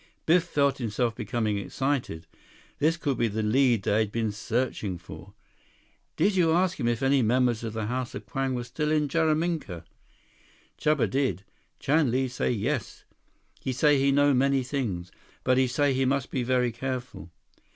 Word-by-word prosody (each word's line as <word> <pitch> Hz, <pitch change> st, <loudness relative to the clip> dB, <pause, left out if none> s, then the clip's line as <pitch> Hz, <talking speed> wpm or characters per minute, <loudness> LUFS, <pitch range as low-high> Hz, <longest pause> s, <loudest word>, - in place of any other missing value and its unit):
Biff 170 Hz, +1 st, +4 dB
felt 140 Hz, -5 st, +1 dB
himself 115 Hz, 0 st, -1 dB
becoming 110 Hz, -2 st, -1 dB
excited. 130 Hz, -, -2 dB, 0.5 s
This 160 Hz, +3 st, +2 dB
could 140 Hz, -7 st, -2 dB
be 115 Hz, -, +3 dB
the 110 Hz, +1 st, -2 dB
lead 120 Hz, -1 st, +3 dB
they 105 Hz, +2 st, +2 dB
had 110 Hz, -2 st, 0 dB
been 115 Hz, -1 st, -1 dB
searching 110 Hz, -3 st, -2 dB
for. 85 Hz, +3 st, -12 dB, 0.8 s
"Did 200 Hz, -1 st, +2 dB
you 165 Hz, -3 st, +3 dB
ask 185 Hz, +1 st, +1 dB
him 120 Hz, -, 0 dB
if 120 Hz, +1 st, 0 dB
any 135 Hz, 0 st, +3 dB
members 120 Hz, 0 st, +2 dB
of 110 Hz, -2 st, -4 dB
the 110 Hz, -1 st, -3 dB
House 125 Hz, +2 st, -3 dB
of 105 Hz, -, -7 dB
Kwang 130 Hz, +5 st, -2 dB
were 120 Hz, -, -3 dB
still 150 Hz, +5 st, -3 dB
in 150 Hz, -1 st, +2 dB
Jaraminka?" 155 Hz, -, -1 dB, 0.9 s
"Chuba 150 Hz, -3 st, +2 dB
did. 135 Hz, -7 st, -1 dB, 0.3 s
Chan 150 Hz, -1 st, +2 dB
Li 130 Hz, +2 st, +1 dB
say 125 Hz, -, -2 dB
yes. 120 Hz, +2 st, -2 dB, 0.6 s
He 130 Hz, -, -3 dB
say 145 Hz, +3 st, +3 dB
he 140 Hz, +1 st, +3 dB
know 145 Hz, +1 st, +4 dB
many 135 Hz, +1 st, +2 dB
things. 115 Hz, -10 st, -3 dB, 0.3 s
But 130 Hz, 0 st, +3 dB
he 130 Hz, -, +3 dB
say 140 Hz, +2 st, +1 dB
he 130 Hz, +1 st, +1 dB
must 135 Hz, 0 st, 0 dB
be 130 Hz, -, -1 dB
very 125 Hz, 0 st, +1 dB
careful. 125 Hz, -6 st, -5 dB
130 Hz, 170 wpm, -27 LUFS, 110-140 Hz, 0.9 s, Biff